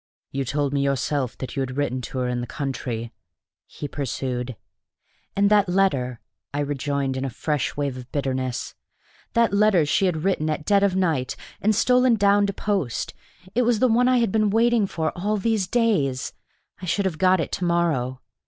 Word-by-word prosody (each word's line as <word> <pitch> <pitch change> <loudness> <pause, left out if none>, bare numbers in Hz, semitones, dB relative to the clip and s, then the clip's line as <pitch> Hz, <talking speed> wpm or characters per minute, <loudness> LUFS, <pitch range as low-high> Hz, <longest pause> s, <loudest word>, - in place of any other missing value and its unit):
"You 135 0 -2
told 145 +1 -1
me 140 - +1
yourself 140 -1 -1
that 130 - -6
you - - -2
had 130 0 -3
written 130 -3 -1
to 130 - -6
her 125 -1 0
in 125 0 -1
the 120 - -5
country," 120 -4 -4 0.5
he 145 - -6
pursued. 130 -3 -3 0.8
"And 200 +1 +4
that 205 -3 +4
letter!" 135 -11 +1 0.3
I 145 - -1
rejoined, 140 -1 -1
in 130 - -2
a 135 - -1
fresh 145 +5 -2
wave 140 -3 -1
of 125 0 -10
bitterness: 130 -3 -2 0.6
"that 230 -2 +3
letter 200 -5 +4
she 175 +6 +2
had 160 -3 -1
written 180 -5 +1
at 155 0 -2
dead 200 -1 +4
of 200 -2 +2
night, 160 -9 0 0.3
and 215 +1 +3
stolen 250 +2 +4
down 200 -1 +4
to 200 - -2
post, 190 - -2 0.4
it 245 - +2
was 240 -1 +3
the 255 - +3
one 245 +2 +3
I 255 0 +4
have 230 -5 +2
been 215 0 +2
waiting 225 0 +3
for 160 -4 -2
all 205 +4 0
these 210 -2 0
days! 185 - +1 0.5
I 180 - -6
should 200 +3 +1
have 170 -5 -2
got 185 -1 +4
it 160 - -2
to - - -3
morrow. 160 -8 0
155 Hz, 190 wpm, -24 LUFS, 135-200 Hz, 0.8 s, And